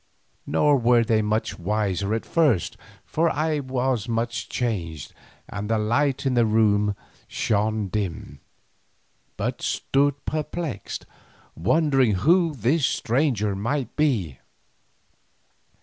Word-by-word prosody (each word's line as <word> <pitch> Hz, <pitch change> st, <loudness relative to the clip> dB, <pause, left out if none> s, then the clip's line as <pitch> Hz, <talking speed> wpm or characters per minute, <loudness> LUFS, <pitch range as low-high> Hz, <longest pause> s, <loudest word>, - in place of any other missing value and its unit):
Nor 145 Hz, -1 st, +3 dB
were 120 Hz, -1 st, +4 dB
they 110 Hz, -1 st, +2 dB
much 110 Hz, +1 st, -1 dB
the -, -, -14 dB
wiser 100 Hz, +1 st, 0 dB
at 115 Hz, -, -4 dB
first, 145 Hz, -, +2 dB, 0.3 s
for 165 Hz, +2 st, +1 dB
I 155 Hz, +1 st, 0 dB
was 130 Hz, -4 st, -1 dB
much 115 Hz, -3 st, -2 dB
changed 85 Hz, -, -3 dB, 0.3 s
and 105 Hz, +1 st, -5 dB
the 115 Hz, -, +2 dB
light 125 Hz, +6 st, +1 dB
in 135 Hz, -, +2 dB
the 120 Hz, -1 st, +4 dB
room 105 Hz, -2 st, +2 dB, 0.3 s
shone 110 Hz, 0 st, 0 dB
dim, 90 Hz, -8 st, -4 dB, 1.0 s
but -, -, -3 dB
stood 140 Hz, 0 st, +1 dB
perplexed, 155 Hz, -1 st, -4 dB, 0.5 s
wondering 135 Hz, -, +2 dB
who 165 Hz, -, +3 dB
this 135 Hz, +7 st, +1 dB
stranger 115 Hz, -5 st, 0 dB
might 120 Hz, +5 st, -2 dB
be. 105 Hz, -, 0 dB
115 Hz, 115 wpm, -24 LUFS, 105-140 Hz, 1.0 s, were